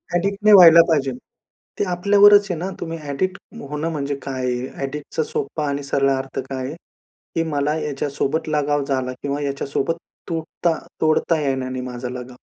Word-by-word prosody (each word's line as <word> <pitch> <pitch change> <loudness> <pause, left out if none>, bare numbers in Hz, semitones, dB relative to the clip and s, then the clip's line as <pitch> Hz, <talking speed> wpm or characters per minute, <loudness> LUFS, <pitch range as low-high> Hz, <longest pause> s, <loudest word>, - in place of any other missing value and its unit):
Addict 200 +3 0
नाही 215 0 +7
व्हायला 170 -3 +10
पाहिजे. 140 -4 +1 0.7
ते - - +2
आपल्यावरच 205 +3 +6
आहे 180 - -1
ना, 180 +3 -3
तुम्ही 165 -1 -4
ॲडिक्ट 155 +6 -2 0.3
होणं 150 +2 -2
म्हणजे 140 -2 -2
काय 130 -2 -4
आहे? 125 0 -2 0.2
ॲडिक्ट 145 +2 -8
चा 160 - +2
सोप्पा 150 +1 -3
आणि 140 0 -3
सरळ 140 0 +1
अर्थ 135 0 -3
काय 130 -1 -4
आहे? 145 - -6 0.6
की 165 - +2
मला 145 0 0
याच्यासोबत 145 +1 -2
लगाव 145 -1 +1
झाला 130 -2 -1
किंवा 140 +1 -2
याच्यासोबत 140 +2 -2 0.3
तुटता 165 +1 -1 0.3
तोडता 160 +1 +2
येईना 135 -2 -1
नाही 130 0 -4
माझा 125 0 -5
लगाव. 125 0 -8
145 Hz, 170 wpm, -21 LUFS, 135-165 Hz, 0.7 s, व्हायला